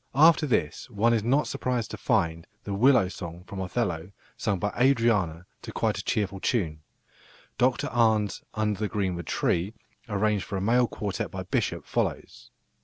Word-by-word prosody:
After 155 +1 +6
this 80 - -1
one 115 +1 +2
is 110 -3 +1
not 135 +6 +2
surprised 125 -4 -2
to - - -4
find 85 -8 0 0.2
the 100 - -4
"Willow 120 -1 +5
song" 85 -2 -8
from 95 +1 -6
Othello 90 -3 -2 0.2
sung 100 - -1
by 105 +3 -1
Adriana 115 -10 +2 0.2
to - - -8
quite - - 0
a - - -4
cheerful 100 -2 -1
tune. 85 -10 -1 0.8
Dr 125 0 +2
Arne's 110 -4 +2
"Under 105 -2 0
the 105 - 0
greenwood 95 -5 -2
tree," 95 +6 0 0.3
arranged 105 -1 +1
for 100 - -4
a - - -1
male 120 +4 +3
quartet 100 -4 -3
by 95 -1 -5
Bishop, 90 - -1
follows. - - -3
105 Hz, 165 wpm, -27 LUFS, 90-120 Hz, 0.8 s, After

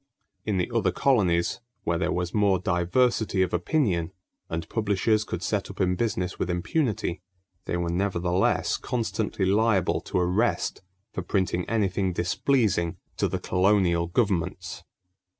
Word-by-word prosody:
In 105 -3 +1
the 90 - -1
other - - +2
colonies 90 -11 +2 0.2
where 85 -1 0
there 90 -1 0
was 90 -1 -2
more 100 -3 +3
diversity 95 +3 +1
of 90 - -3
opinion 90 - +1 0.4
and 80 0 -3
publishers 105 0 +1
could 90 -4 -5
set 100 0 -1
up 100 - -10
in 90 -2 +2
business 95 -3 -2
with 90 - -1
impunity, 90 - -1 0.4
they 90 - -1
were 85 -1 -1
nevertheless 90 0 +1
constantly 110 -4 -2
liable 100 -1 +2
to - - -3
arrest 90 +7 +1 0.3
for - - -3
printing 90 -3 -1
anything 95 -4 0
displeasing 90 -1 +1 0.2
to - - +2
the - - -2
colonial 90 -2 +2
governments. 95 -1 -1
95 Hz, 135 wpm, -26 LUFS, 90-105 Hz, 0.4 s, more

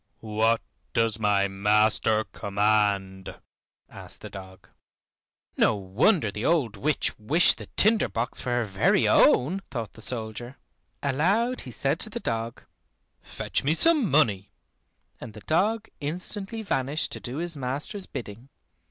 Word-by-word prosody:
"What 115 +1 +2 0.3
does 115 -1 +1
my 100 -2 +2
master 105 +2 +2
command?" 100 -2 -1 0.5
asked - - -12
the - - -9
dog. 95 -1 -11 0.9
"No 110 - +3
wonder 105 - +1
the 105 +2 -6
old 140 -10 +1
witch 145 +8 0
wished 150 +12 +3
the - - -9
tinder 215 +1 +3
box 115 +2 -4
for - - -4
her 120 0 +1
very 95 -3 +2
own," 160 +11 +4
thought 115 -4 -5
the 110 - -14
soldier. 120 +2 -2 0.5
Aloud 195 - +1
he 130 - -9
said 135 +6 -1
to 220 - +4
the 230 +3 -5
dog, 115 - -4 0.6
"Fetch - - -4
me 150 +4 +2
some 305 - +3
money," 105 -10 +2 0.7
and 115 -3 -9
the 105 - -10
dog 205 - 0
instantly 195 +8 -3
vanished 140 -5 0
to - - -5
do 125 +2 -6
his 170 0 -4
master's 140 +9 -2
bidding. 115 +3 -8
120 Hz, 140 wpm, -26 LUFS, 105-160 Hz, 0.9 s, own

